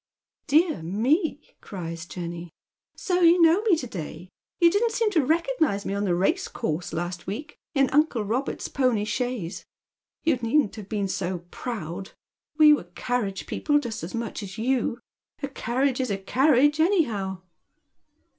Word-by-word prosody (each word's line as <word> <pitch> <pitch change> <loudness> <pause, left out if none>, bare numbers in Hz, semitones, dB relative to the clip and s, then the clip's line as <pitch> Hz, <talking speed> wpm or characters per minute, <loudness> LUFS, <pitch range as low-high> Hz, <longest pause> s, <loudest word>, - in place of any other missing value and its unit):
" - - -56
De 325 +1 +5
ah - - -9
me! 255 - +1
" - - -35
cries 165 -4 -6
Jenny, 170 -1 -6 0.3
" - - -59
So 360 -1 +2
you 345 0 +6
know 335 +3 +5
me 430 -5 +4
to 305 - -4
day; 175 -4 -7 0.3
you 340 -1 +6
didn't 450 +4 +1
seem 450 -2 +1
to 325 -7 +3
recognise 315 - +1
me - - -2
on 200 +1 -1
the 180 -3 +2
racecourse 180 - -1
last 175 +1 -4
week, 285 +10 -5 0.2
in 275 -1 +4
uncle 290 -6 +2
Robert's 245 +7 -2
pony 250 -6 +1
chaise. 235 -6 -3 0.6
You 315 -5 +3
needn't 235 -1 +1
have 205 -2 -9
been 205 -3 -1
so 180 -2 -3
proud. 190 -5 -5 0.4
We 305 -1 +8
were 290 - -1
carriage 220 -6 -2
people 290 -1 +1
just 235 -6 -3
as 170 - -5
much 230 -1 -4
as 195 -1 -8
you. 240 0 0 0.4
A - - 0
carriage 260 0 0
is 255 - -2
• 195 -1 -3
carriage 290 +4 +4
anyhow." 220 - +1
240 Hz, 165 wpm, -25 LUFS, 190-305 Hz, 0.6 s, We